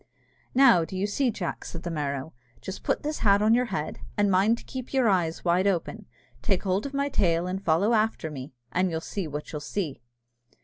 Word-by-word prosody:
"Now, 245 -10 +7
do 185 +3 -6
you 190 - 0
see, 250 +6 +1
Jack," 190 -6 -4
said 165 0 -7
the 175 - -3
Merrow: 140 -1 -3 0.3
"just 190 - -7
put - - -1
this 300 +1 -2
hat 200 -1 +4
on 220 +1 +5
your 250 +1 +3
head, 190 -9 -4 0.2
and 205 -1 +3
mind 200 +5 +4
to - - -12
keep 260 0 -7
your 260 -3 +3
eyes 175 -5 +1
wide 180 +3 +3
open. 195 +3 -2 0.3
Take 195 -5 0
hold 195 +5 0
of 280 - -10
my 280 0 +1
tail, 175 -10 +1
and 190 +2 -3
follow 190 +7 +3
after 215 -7 +1
me, 135 -1 -7 0.2
and 185 +4 +1
you'll 160 -1 -2
see 180 +2 -4
what 150 0 -6
you'll 150 - -4
see." 155 -2 -3
190 Hz, 215 wpm, -27 LUFS, 165-220 Hz, 0.3 s, Now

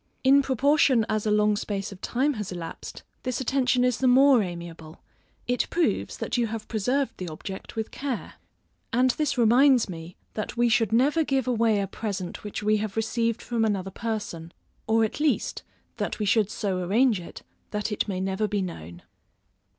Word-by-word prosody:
In 275 +1 +6
proportion 270 -2 +3
as 215 0 0
a - - +2
long 210 0 +3
space 200 -1 -3
of 190 - -11
time 275 +4 0
has 210 -6 -5
elapsed, 175 -2 -7 0.2
this 255 -2 -2
attention 255 -1 +2
is 250 -3 +1
the 260 - +2
more 260 0 +6
amiable; 170 -3 -7 0.5
it 245 0 0
proves 345 -1 0
that - - -2
you 235 -1 +1
have 220 0 -6
preserved 250 +6 0
the 180 - -5
object 190 +7 -8
with 220 0 -3
care. 270 -4 -4 0.6
And 250 +2 +3
this 285 0 -1
reminds 245 +2 +5
me, 170 -1 -8 0.2
that 215 +2 -5
we 240 0 +3
should 225 -2 +2
never 285 +8 +3
give 270 -3 0
away 230 -3 +2
a - - 0
present 195 -3 -5
which 210 0 -5
we 215 +1 +3
have 210 0 -4
received 230 +1 0
from 235 -2 -1
another 195 -3 -1
person, 205 -7 -4 0.4
or 225 0 +3
at 220 - -2
least 300 -1 0 0.4
that - - -2
we 210 - -2
should 210 0 +3
so 195 -3 -2
arrange 210 +4 +2
it, 170 - -10 0.3
that 210 +1 -3
it 210 - -1
may 190 -3 -2
never 190 +3 -1
be 205 -2 -1
known. 85 - -8
220 Hz, 180 wpm, -26 LUFS, 195-250 Hz, 0.6 s, In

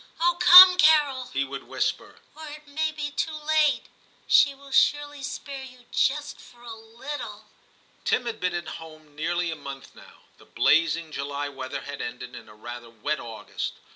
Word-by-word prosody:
Oh! 345 +1 +2
come, 365 +1 +10
Carol/ 295 -6 +3
he 135 - -1
would 135 0 -8
whisper, - - -3 0.2
*or 315 0 -10
it 300 0 -11
may 310 +2 -2
be 300 -1 -5
too 315 +2 -3
late; 305 -1 +1 0.4
she 280 -1 +4
will 275 0 -16
surely 290 +1 +1
spare 275 0 -7
you 255 -2 -13
just 290 +2 -1
for 240 0 -18
a 235 -1 -8
little.' 230 +6 -9 0.6
Tim 245 - 0
had 230 -2 -5
been 180 -1 -2
at 175 -1 -5
home 155 -2 -14
nearly 170 +2 -2
a - - -5
month 140 -3 -10
now; - - -18 0.2
the - - -18
blazing 165 +1 +1
July 140 0 -4
weather 130 -2 -7
had - - -8
ended - - -7
in - - -12
a 105 - -15
rather 120 +2 -10
wet 115 +7 -4
August. 110 -3 -6
240 Hz, 175 wpm, -25 LUFS, -, 0.6 s, come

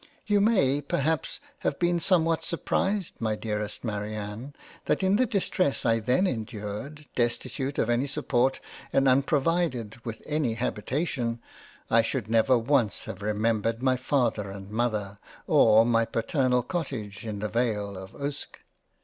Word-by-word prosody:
You 205 -1 +3
may 145 - +3
perhaps 145 +2 -1 0.2
have - - -1
been 175 0 +2
somewhat 165 -2 +2
surprised 190 +2 -1
my 110 -1 0
Dearest 105 -1 -4
Marianne, 105 +4 -5 0.3
that - - +1
in 190 +2 +4
the 255 +1 +3
Distness 185 -7 0
I 115 -1 +3
then 125 - +2
endured, 115 - -4
destitute 130 +3 -1
of - - +1
any 120 +3 +1
support, 135 -3 +1 0.3
and 135 0 +3
unprovided 135 -4 +1
with 115 -2 -6
any 150 -7 0
Habitation, 120 +1 -2 0.5
I 115 - +6
should 115 -1 -3
never 115 +3 +4
once 120 -2 +1
have 95 - -7
remembered 110 +2 0
my 130 -1 +3
Father 125 -6 0
and 95 +1 -9
Mother 105 -3 -1 0.3
or 110 +1 +6
my 115 -1 +3
paternal 125 +2 +1
Cottage 125 - -4
in 105 -3 -4
the^Vale 105 -2 -1
of 95 0 -9
Uske. 140 0 -5
120 Hz, 140 wpm, -27 LUFS, 110-145 Hz, 0.5 s, I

